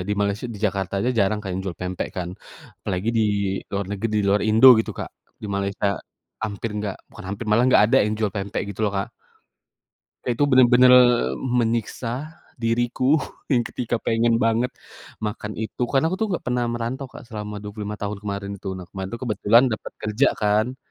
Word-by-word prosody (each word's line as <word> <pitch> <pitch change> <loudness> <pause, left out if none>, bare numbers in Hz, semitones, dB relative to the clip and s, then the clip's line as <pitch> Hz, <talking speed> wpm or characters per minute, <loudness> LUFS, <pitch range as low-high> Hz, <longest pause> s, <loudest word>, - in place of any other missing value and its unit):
di - - +1
Malaysia, 100 +4 -1
di - - -8
Jakarta 95 -1 -3
aja 120 +5 +1
jarang 100 +2 +2
kan 95 -2 -4
jual 90 -4 -4
pempek 90 0 -3
kan, 90 -1 -3 0.5
apalagi 95 +4 -2
di - - +4 0.5
luar 100 -1 -2
neget 105 +2 -2
di - - +3
luar 100 +1 +3
Indo 110 +4 +6
gitu - - -4
Kak, - - -5 0.3
di - - -4
Malaysia 100 0 -1 0.5
hampir 110 +1 -3
nggak 105 -2 -3
bukan - - -11
hampir, 100 +3 -5
malah 110 +3 +4
nggak - - +6
ada 115 - +3
yang 105 +1 0
jual 105 -3 0
pempek 100 0 -3
gitu 100 - -8
loh 105 - +1
Kak. 100 - -2 1.1
Itu 120 +3 -1
bener-bener 125 -1 +7 0.5
menyiksa 120 +4 -2 0.2
diriku 120 +5 +1 0.3
yang 120 -4 +2
ketika 120 -1 -2
pengen 115 +1 +2
banget 115 +2 +1 0.5
makan 105 -1 -5
itu, 110 +2 -4
kan 140 +3 +3
aku 170 - 0
tuh 220 +3 -1
nggak 180 - -2
pernah 125 -1 0
merantau, 120 +3 -4
Kak, - - -12
selama 105 -2 -6
25 105 0 -6
tahun 105 0 -4
kemarin 100 -1 -4
itu, 100 0 -7
nah 90 - -9
kemarin 95 +2 -6
kebetulan 115 0 +3
dapat - - -9
kerja 110 +6 +2
kan. 110 +4 +1
110 Hz, 180 wpm, -23 LUFS, 100-120 Hz, 1.1 s, bener-bener